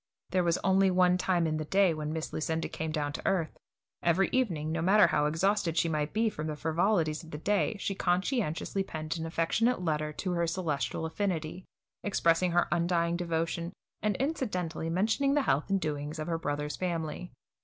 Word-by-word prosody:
There 185 0 +2
was 170 0 +2
only 190 0 +4
one 180 -1 +4
time 180 -2 +1
in 155 -1 0
the 155 - -2
day 190 +1 +3
when 155 -1 -4
Miss 160 0 -4
Lucinda 160 +1 -1
came 160 0 -4
down 145 -2 -2
to - - -5
earth. 180 -5 0 0.5
Every 175 +3 +2
evening, 170 -12 0
no 165 0 -1
matter 200 +5 +6
how 150 0 +2
exhausted 170 +1 +1
she 165 - +3
might 150 -2 -1
he 225 +1 +3
from 155 -7 -3
the 155 - -3
frivolities 160 0 +1
of 160 - -12
the 150 - -6
day, 205 +5 0
she 195 - -2
conscientiously 190 - 0
penned 155 -3 -4
an 165 - -3
affectionate 185 +9 +1
letter 150 -2 -1
to 185 +4 -3
her 170 -1 0
celestial 165 -3 -2
affinity, 175 -1 -3 0.4
expressing 180 -3 +2
her 175 0 +2
undying 170 0 +1
devotion, 170 0 -2 0.3
and 210 -2 +1
incidentally 185 - -2
mentioning 220 - +1
the 290 - +3
health 145 - +1
and 195 0 +2
doings 150 -2 -3
of 155 - -3
her 165 -1 -2
brother's 150 -1 -3
family. 170 -1 -3
170 Hz, 185 wpm, -30 LUFS, 155-190 Hz, 0.5 s, matter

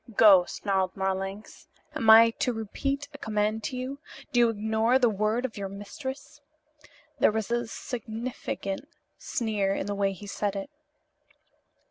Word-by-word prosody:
"Go!" 195 -5 +7
snarled 190 -1 -1
Marlanx. 195 +2 -4 0.3
"Am 225 - 0
I 225 +1 +9
to 250 - +1
repeat 275 +6 -3
a 285 - -10
command 215 -1 -1
to 255 - -3
you? 260 +3 -5 0.3
Do 245 - +2
you 235 -1 +5
ignore 220 +3 +2
the 245 -3 +3
word 215 +4 0
of 235 - -5
your 200 -1 -4
mistress?" 265 +9 -8 0.8
There - - +5
was 220 +1 -3
a 240 0 0
significant 225 -1 -5 0.3
sneer 210 -5 -1
in - - -2
the 205 - -2
way 200 -1 +1
he 200 +2 -11
said 205 0 -2
it. 195 +9 -5
220 Hz, 150 wpm, -27 LUFS, 200-240 Hz, 0.8 s, I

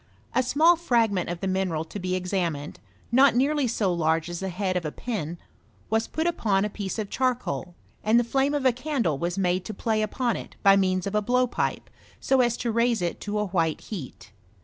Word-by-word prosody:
A - - +3
small 310 +7 +4
fragment 230 - +1
of 175 0 -4
the 195 - -1
mineral 185 -4 0
to 205 - -7
be 185 0 -1
examined, 175 -5 -2 0.3
not 265 +1 +5
nearly 280 +2 +2
so 210 -5 0
large 165 0 0
as 175 - -4
the 190 - -3
head 185 +1 -2
of 180 - 0
a - - -2
small 150 - -8
pin, 175 -9 -4 0.5
was 225 0 +1
put 320 - -2
upon 210 - +1
a 210 - -3
piece 200 0 -4
of 210 -2 -4
charcoal, 240 - -1 0.3
and 220 +2 +4
the - - +2
flame 270 +4 +1
of 285 -2 -1
a 260 - +6
candle 245 - -1
was 175 +3 -2
made 180 -1 +1
to 215 - -6
play 220 +1 0
upon 235 +2 -1
it - - -9
by 195 0 +7
means 185 -2 +1
of 200 - -3
a 210 - +2
blowpipe, 250 +3 0 0.3
so 265 -1 +3
as 240 -1 +1
to 235 - -1
raise 235 -3 +1
it 170 - -2
to 210 0 -3
a 210 - +1
white 165 -5 0
heat. 135 - -8
205 Hz, 215 wpm, -26 LUFS, 180-245 Hz, 0.5 s, by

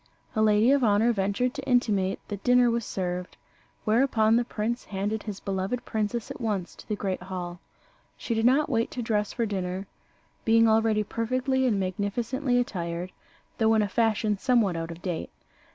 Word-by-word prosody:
A 215 - +2
lady 215 +3 +4
of 280 -2 +3
honour 220 +2 +4
ventured 200 +5 0
to 280 -2 -6
intimate 205 -6 +2
that 205 -1 -5
dinner 245 -1 +5
was 235 0 -1
served; 180 -2 -4 0.5
whereupon 225 -1 +3
the 240 - +3
prince 235 +1 -3
handed 205 +2 -2
his 205 -3 -6
beloved 195 +5 -3
princess 220 +1 -2
at - - -8
once 205 -6 -2
to - - -15
the 210 - 0
great 190 -3 -3
hall. 180 -1 -6 0.6
She 235 - -3
did 225 0 +1
not 280 +4 +4
wait 230 -4 0
to 245 - -4
dress 210 -2 0
for 235 - -1
dinner, 190 -2 -3 0.6
being 230 0 +5
already 220 -1 +3
perfectly 255 +5 0
and 210 -5 +1
magnificently 230 +8 -1
attired, 180 -7 -2 0.5
though 225 0 +4
in 215 - +3
a - - 0
fashion 215 -1 +1
somewhat 235 -8 +2
out 165 0 -4
of 170 +1 -9
date. 175 -4 -3
215 Hz, 175 wpm, -27 LUFS, 195-235 Hz, 0.6 s, dinner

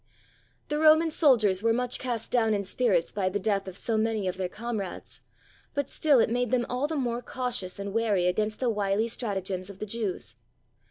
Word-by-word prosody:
The 295 0 -1
Roman 315 +1 +5
soldiers 225 - +4
were 230 +1 +3
much 250 +1 0
cast 240 -3 -3
down 225 -3 +3
in 200 -1 -2
spirits 195 -5 +1
by 195 -2 0
the 195 - -1
death 195 -1 0
of 185 0 -6
so 225 +1 -1
many 220 -3 0
of 185 - -2
their 185 -1 -3
comrades, 220 -4 -5 0.5
but 285 -1 -2
still 300 -4 +3
it 225 - +2
made 245 0 0
them 245 -1 +1
all 255 +4 -1
the 320 - -3
more 245 -4 -1
cautious 245 -7 -3
and 200 0 -5
wary 210 -5 +1
against 215 +4 0
the 250 -3 +1
wily 205 +1 0
stratagems 195 -5 -3
of 200 - -10
the 215 - -5
Jews. 205 - -4
220 Hz, 200 wpm, -27 LUFS, 195-245 Hz, 0.5 s, Roman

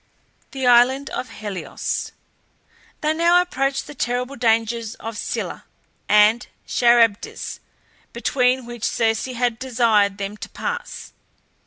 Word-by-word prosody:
THE 265 -1 -4
ISLAND 250 +3 +4
OF 255 - -4
HELIOS. 205 -4 -4 0.9
They 305 +1 +1
now 340 +2 +4
approached 275 -6 -1
the - - -10
terrible 250 +1 -2
dangers 230 -1 0
of 225 0 -7
Scylla - - -4 0.4
and 210 +3 +5 0.2
Charybdis, 235 -3 +2 0.5
between 250 +1 +1
which 240 -2 -9
Circe 225 -1 +1
had 245 -2 -1
desired 225 -6 +2
them 200 +1 -5
to - - -8
pass. 485 0 -6
240 Hz, 115 wpm, -22 LUFS, 225-260 Hz, 0.9 s, and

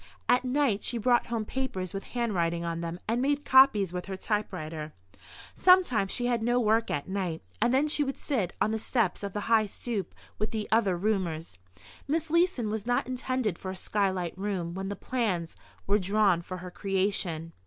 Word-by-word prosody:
At 250 - +4
night 255 -5 +1
she 240 - -1
brought 240 +2 +2
home 230 -2 -2
papers 235 -9 -3
with 195 0 -5
handwriting 170 -8 0
on 170 0 -3
them 170 +1 -4
and 235 +3 +1
made 285 +2 0
copies 240 -9 +6
with 180 +1 -4
her 190 -1 -4
typewriter. 160 -7 -3 0.6
Sometimes 350 - +4
she 245 - 0
had 240 -2 +1
no 240 +2 +2
work 225 0 +2
at 145 - -2
night, 185 -4 -3 0.2
and 240 - +3
then 270 +4 +3
she 300 -1 +3
would 275 -1 -3
sit 215 - -1
on 215 - +2
the 220 - -1
steps 225 -3 0
of 200 -2 -5
the 205 - -2
high 220 0 +3
stoop 205 -2 -4 0.2
with 215 - 0
the 215 -2 -3
other 210 -5 +3
roomers. 170 - -2 0.5
Miss 315 +2 -1
Leeson 335 - +2
was 220 +1 -4
not 245 - +1
intended 255 -6 -2
for 190 - -5
a 190 - -4
sky 200 +2 0
light 180 -3 -3
room 185 -3 -3
when 195 +1 -4
the 200 - -3
plans 190 -8 -2 0.3
were 205 +2 +3
drawn 195 -2 +2
for 185 +2 -7
her 180 0 -8
creation. 185 -4 -1
210 Hz, 195 wpm, -28 LUFS, 185-245 Hz, 0.6 s, copies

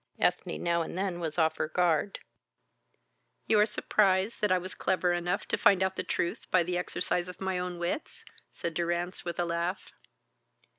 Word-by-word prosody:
Ethne - - 0
now 170 0 +2
and 165 - -5
then 190 -2 -1
was 160 -2 -4
off 160 -1 +2
her - - 0
guard. 170 +2 +1 1.3
You 215 - +4
are 210 - +5
surprised 200 -1 +2
that 210 -2 +2
I 185 - +5
was 185 +1 -5
clever 180 -1 +1
enough 175 +2 -1
to - - 0
find 195 -2 +5
out 190 0 0
the - - -1
truth 170 - -2
by 185 -2 +4
the 180 +1 -2
exercise 180 0 -1
of 180 - -8
my 190 -1 -1
own 180 -1 -4
wits?" 175 - -4 0.3
said 170 - -4
Durrance, 175 +2 -2
with 170 -1 -4
a 175 - +2
laugh. 170 +3 -2
180 Hz, 185 wpm, -30 LUFS, 170-190 Hz, 1.3 s, are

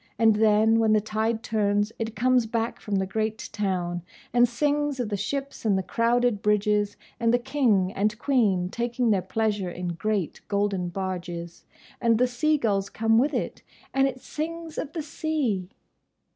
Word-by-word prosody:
And 220 -1 +4
then, 220 +1 +4
when 220 -1 +4
the 215 - +5
tide 220 +2 -1
turns, 205 -1 +1
it 225 -1 -3
comes 250 +1 +3
back 230 +1 -2
from 205 - -3
the 190 0 +1
great 220 +3 -3
town, 180 -4 -1 0.3
and 240 0 +5
sings 290 +2 0
of 240 -4 -1
the 205 - -1
ships 275 +7 -4
and 205 -4 +2
the 190 - -1
crowded 235 0 +1
bridges, 210 0 +1 0.2
and 230 -1 +3
the 245 - +4
King 240 -8 +1
and 210 +2 0
Queen 210 -10 +2
taking 240 +2 0
their 195 -3 +2
pleasure 210 -3 -1
in 175 0 -4
great, 190 +1 -2
golden 200 -3 0
barges. 175 -2 -5 0.4
And 230 -2 +4
the 250 - +4
sea 300 +5 +1
gulls 200 -6 0
come 225 0 +2
with 280 +5 +1
it, - - -3 0.3
and 270 0 +4
it 255 -1 -5
sings 325 +3 -5
of 300 - -5
the 320 - -3
sea!" 290 - -2
220 Hz, 170 wpm, -26 LUFS, 200-245 Hz, 0.4 s, the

